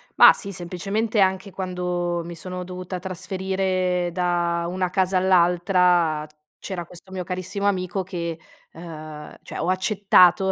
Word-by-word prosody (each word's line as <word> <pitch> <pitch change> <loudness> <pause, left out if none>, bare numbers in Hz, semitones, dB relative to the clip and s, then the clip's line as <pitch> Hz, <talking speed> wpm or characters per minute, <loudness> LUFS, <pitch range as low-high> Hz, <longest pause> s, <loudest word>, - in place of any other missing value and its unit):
Mah - - +10
sì, 200 - -4
semplicemente 195 +5 -2
anche 190 +1 +2
quando 180 -2 -2
mi 170 +1 -8
sono 180 +2 -6
dovuta 180 0 -6
trasferire 185 -1 -1
da 175 -1 0
una 185 0 -1
casa 185 0 +1
all'altra 175 -3 +3 0.3
c'era 180 -3 -5
questo 180 +2 -14
mio 185 -1 -4
carissimo 185 +3 -3
amico 185 -1 -1
che, 170 -2 -4 0.3
uhm 160 -2 -9 0.3
cioè - - -7
ho 170 - -1
accettato 190 -1 +4
180 Hz, 130 wpm, -23 LUFS, 175-190 Hz, 0.3 s, Mah